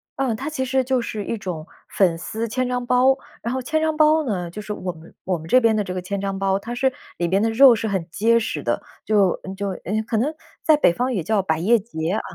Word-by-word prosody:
嗯， 260 -5 0
它 275 +6 -5
其 295 -4 -2
实 265 0 +1
就 260 0 +1
是 215 -3 -4
一 230 - -2
种 175 -5 -5 0.2
粉 175 -4 +2
丝 225 +6 -4
千 255 +3 -1
张 250 0 -2
包。 255 +2 +4 0.3
然 235 - -3
后 260 - -2
千 315 +6 0
张 315 -1 +1
包 310 0 +4
呢， 180 -8 -2
就 210 +4 -7
是 210 0 -4
我 185 -3 -4
们 165 +1 -15
我 180 -2 0
们 160 - -10
这 255 - +6
边 225 -1 +3
的 210 - +1
这 185 - -5
个 185 - -3
千 195 +2 -4
张 195 -1 -2
包， 195 0 +1
它 235 +4 -6
是 260 +2 +2 0.3
里 175 - 0
边 190 +3 +2
的 225 - +2
肉 255 +2 +8
是 220 0 -3
很 190 -5 -2
结 230 +4 +3
实 225 - -3
的， - - -1 0.2
就 205 -4 +2 0.2
就， 200 0 -3
呃， 205 +3 -3
可 225 - 0
能 285 +8 0 0.3
在 310 - +5
北 290 - +4
方 250 +5 -1
也 190 - -1
叫 210 +2 +1
百 160 -3 0
叶 225 +7 +4
节 170 -6 -4
啊。 215 - 0
220 Hz, 280 characters per minute, -22 LUFS, 190-250 Hz, 0.3 s, 肉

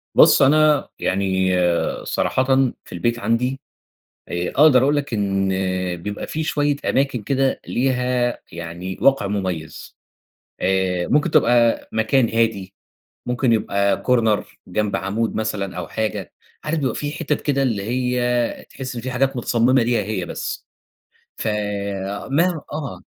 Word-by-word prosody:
بُصّ، - - +7
أنا 150 +2 +4
يعني 95 -1 +1 0.5
صراحةً 130 - 0 0.4
في - - -16
البيت 120 0 -1
عندي 120 +5 0 0.7
آآ، 85 +1 -2
أقدر 140 -3 +6
أقول 145 +2 +3
لك 140 -5 -2
إن 95 -2 0 0.5
بيبقى 105 +1 -5
في 160 0 -3
شوية 145 -2 +1
أماكن 135 -4 +1
كده 135 +3 0
ليها 125 -1 0
يعني 85 +2 -6
وقع 135 -7 +3
مميز، 95 -6 -4 0.7
آآ، 95 -2 +1
ممكن 150 +3 +2
تبقى 120 -4 +3
مكان 110 +2 +2
هادي، 110 -4 0 0.5
ممكن 125 0 +1
يبقى 100 -2 +1
Corner 115 -4 +3 0.3
جنب 105 +3 -1
عامود 110 +4 -2
مثلًا 100 -4 -3
أو 90 - -4
حاجة، 105 -4 -3 0.3
عارف 155 +1 -1
بيبقى 135 -3 -1
في 145 -1 -3
حتت 150 -1 -2
كده 140 -2 +1
اللي 110 -6 -1
هي 125 +1 -1
تحس 130 -2 -7
إن 120 - -4
في 130 +2 -4
حاجات 135 +1 0
متصمّمة 120 +1 +2
ليها 115 -2 +1
هي 95 -3 -3
بس - - -5 0.7
ف - - -3 0.8
ما 170 +2 +2
آه. 150 -4 -5
120 Hz, 135 wpm, -21 LUFS, 100-135 Hz, 0.8 s, بُصّ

